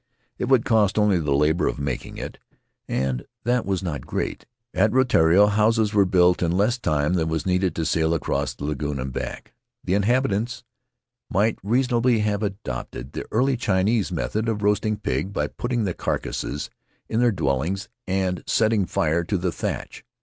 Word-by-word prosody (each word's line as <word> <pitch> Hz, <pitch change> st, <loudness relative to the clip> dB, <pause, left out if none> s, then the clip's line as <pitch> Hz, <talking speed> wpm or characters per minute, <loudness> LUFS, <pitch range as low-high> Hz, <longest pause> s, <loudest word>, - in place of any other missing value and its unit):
It -, -, 0 dB
would 125 Hz, -2 st, +3 dB
cost 110 Hz, -3 st, +3 dB
only 105 Hz, -4 st, +3 dB
the 75 Hz, -3 st, -2 dB
labor 75 Hz, +4 st, +2 dB
of -, -, -2 dB
making 70 Hz, -3 st, -4 dB
it, -, -, -7 dB, 0.5 s
and 65 Hz, -2 st, -1 dB, 0.2 s
that 120 Hz, -2 st, +1 dB
was 95 Hz, -1 st, -1 dB
not 75 Hz, -7 st, -3 dB
great. -, -, -3 dB, 0.3 s
At 105 Hz, +3 st, +3 dB
Rutiaro 105 Hz, -8 st, +5 dB
houses 105 Hz, +1 st, +2 dB
were 100 Hz, -2 st, +5 dB
built 90 Hz, -1 st, +3 dB
in 85 Hz, -2 st, +1 dB
less 105 Hz, +7 st, +2 dB
time 75 Hz, -3 st, +1 dB
than 80 Hz, -3 st, +1 dB
was 80 Hz, -2 st, -2 dB
needed 90 Hz, -2 st, +1 dB
to 80 Hz, -, -1 dB
sail 80 Hz, 0 st, +1 dB
across 80 Hz, -, -2 dB
the -, -, -9 dB
lagoon 75 Hz, -1 st, -2 dB
and 65 Hz, 0 st, -4 dB
back. -, -, -6 dB, 0.3 s
The 90 Hz, -, -1 dB
inhabitants 115 Hz, +2 st, +1 dB, 0.7 s
might 105 Hz, +4 st, +1 dB
reason 120 Hz, +4 st, +1 dB
ably 120 Hz, 0 st, +3 dB
have 105 Hz, -1 st, 0 dB
adopted 70 Hz, -, -5 dB
the -, -, -5 dB
early 130 Hz, +4 st, +2 dB
Chinese 100 Hz, -2 st, +1 dB
method 90 Hz, -, -1 dB
of 105 Hz, -2 st, -2 dB
roasting 105 Hz, +1 st, +1 dB
pig 75 Hz, +8 st, -2 dB
by -, -, 0 dB
putting 120 Hz, -2 st, -2 dB
the 95 Hz, -4 st, -1 dB
carcasses 75 Hz, -, -3 dB, 0.4 s
in 110 Hz, -, -1 dB
their 120 Hz, -1 st, +4 dB
dwellings 85 Hz, +3 st, -1 dB, 0.2 s
and 95 Hz, -1 st, -1 dB
setting 110 Hz, -4 st, +2 dB
fire 80 Hz, +2 st, +1 dB
to 100 Hz, -, 0 dB
the 90 Hz, 0 st, -1 dB
thatch. -, -, -5 dB
95 Hz, 175 wpm, -24 LUFS, 80-110 Hz, 0.7 s, Rutiaro